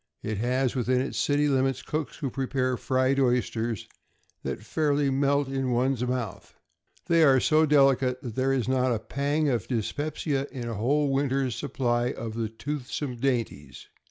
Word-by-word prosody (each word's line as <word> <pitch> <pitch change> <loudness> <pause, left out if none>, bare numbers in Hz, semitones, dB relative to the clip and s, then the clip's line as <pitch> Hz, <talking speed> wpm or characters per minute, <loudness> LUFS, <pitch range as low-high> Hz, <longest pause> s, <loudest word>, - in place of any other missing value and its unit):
It 110 -2 -3
has 125 +2 +1
within 125 0 +1
its 135 - -2
city 145 +1 +2
limits 135 -2 +1
cooks 155 -1 -3
who 140 -6 -3
prepare 130 -1 -1
fried 130 +2 +1
oysters 120 -4 0 0.5
that - - -4
fairly 145 -2 +1
melt 140 +1 +2
in 135 -1 -2
one's 125 0 +1
mouth. 125 -6 -4 0.5
They 170 -2 +3
are 135 -3 +6
so 155 +4 +3
delicate 135 -3 +3
that 120 -4 -5
there 130 +3 +1
is 130 -4 0
not 130 -1 +2
a - - 0
pang 145 +7 -1
of 120 -8 0
dyspepsia 140 +4 -2
in 125 -3 -5
a 115 - -3
whole 140 +7 +1
winter's 135 -2 0
supply 120 -3 0
of 115 -1 -6
the 115 -1 -2
toothsome 135 +1 -4
dainties. 120 - -3
130 Hz, 160 wpm, -27 LUFS, 120-140 Hz, 0.5 s, are